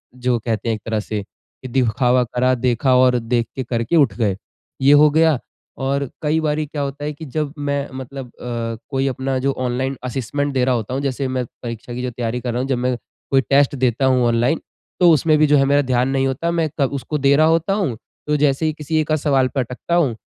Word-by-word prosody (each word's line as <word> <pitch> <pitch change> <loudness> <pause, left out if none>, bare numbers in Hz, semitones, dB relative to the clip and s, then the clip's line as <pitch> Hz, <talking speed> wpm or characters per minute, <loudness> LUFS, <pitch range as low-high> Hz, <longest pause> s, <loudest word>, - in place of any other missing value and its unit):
जो 125 -1 0
कहते 115 0 -2
हैं 115 - +1
एक 105 - -10
तरह 110 -1 -1
से 105 0 -4
कि 130 +5 -15
दिखावा 125 0 +2
करा 125 +2 +1
देखा 125 +1 +2
और 125 -1 +4
देख 115 0 -1
के 130 - -2
करके 120 +4 -1
उठ 140 -10 +4
गए, 105 -5 +1 0.5
ये 135 - +5
हो 150 +1 +7
गया। 160 -3 +3 0.4
और 140 0 -1
कई 155 +1 +1
बारी 150 0 0
क्या 145 0 -5
होता 140 +1 -4
है 150 - -2
कि 160 +2 -9
जब 150 +1 -3
मैं 140 -1 -2
मतलब 130 0 -7
अ, 115 -2 -5
कोई 135 -1 0
अपना 130 0 -2
जो 140 +1 +1
ऑनलाइन 130 +2 -1
असेसमेंट 135 +3 -2
दे 130 - +1
रहा 130 - +2
होता 115 +1 -3
हूँ 135 - -1
जैसे 135 -1 -2
मैं 130 -1 -2 0.2
परीक्षा 115 0 -6
की 125 +1 -3
तैयारी 120 0 -3
कर 120 - -3
रहा 125 - -1
हूँ 135 - -3
जब 130 - +1
मैं 125 0 0 0.4
कोई 135 - +5
टेस्ट 140 +1 +2
देता 130 0 +1
हूँ 130 -2 +3
ऑनलाइन 120 +7 +1 0.4
तो 175 -1 +6
उसमें 155 0 +4
भी 155 - +4
जो 145 0 +5
है 135 - +4
मेरा 145 +1 +3
ध्यान 130 -1 +1
नहीं 135 0 +1
होता, 165 +6 -1
मैं 165 -2 0
क 140 - +4
उसको 145 +2 -3
दे 140 0 +4
रहा 155 +2 +5
होता 165 +4 +2
हूँ। 185 - -1 0.3
तो 150 - +2
जैसे 145 +1 +2
ही 155 - +1
किसी 155 +1 -2
एक-आध 155 0 +1
सवाल 135 -3 +2
पे 135 - -3
अटकता 125 +7 -2
हूँ 145 -10 +2
135 Hz, 235 wpm, -20 LUFS, 125-145 Hz, 0.5 s, हो